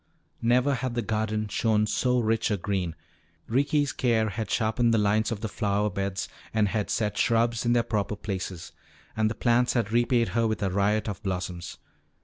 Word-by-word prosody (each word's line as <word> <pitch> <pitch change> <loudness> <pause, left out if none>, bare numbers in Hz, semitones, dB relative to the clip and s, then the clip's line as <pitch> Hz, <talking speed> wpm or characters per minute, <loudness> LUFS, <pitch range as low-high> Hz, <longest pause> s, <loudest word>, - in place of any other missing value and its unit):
Never 125 +4 +3
had 130 -2 -3
the 120 - 0
garden 110 0 -1
shown 105 +1 +1
so 125 +4 +1
rich 115 0 +1
a 105 - +1
green. 95 -3 -2 0.5
Ricky's 145 +3 +1
care 115 -3 +1
had 110 +2 -4
sharpened 115 +1 +2
the - - +3
lines 105 +2 +2
of 110 -2 -3
the 110 - -2
flower 105 -1 0
beds 95 0 -3 0.3
and 105 -2 +3
had 105 -1 -2
set 105 -2 -1
shrubs 115 0 +2
in 120 - +4
their 120 -1 +3
proper 105 -2 -1
places. 95 -4 -5 0.4
And 110 -1 +2
the 110 - -4
plants 120 0 +2
had 115 -4 0
repaid 120 0 +2
her 115 0 +1
with 110 -1 -2
a 95 - 0
riot 100 +3 +1
of 100 -2 -4
blossoms. 90 -3 -4
110 Hz, 185 wpm, -27 LUFS, 100-120 Hz, 0.5 s, in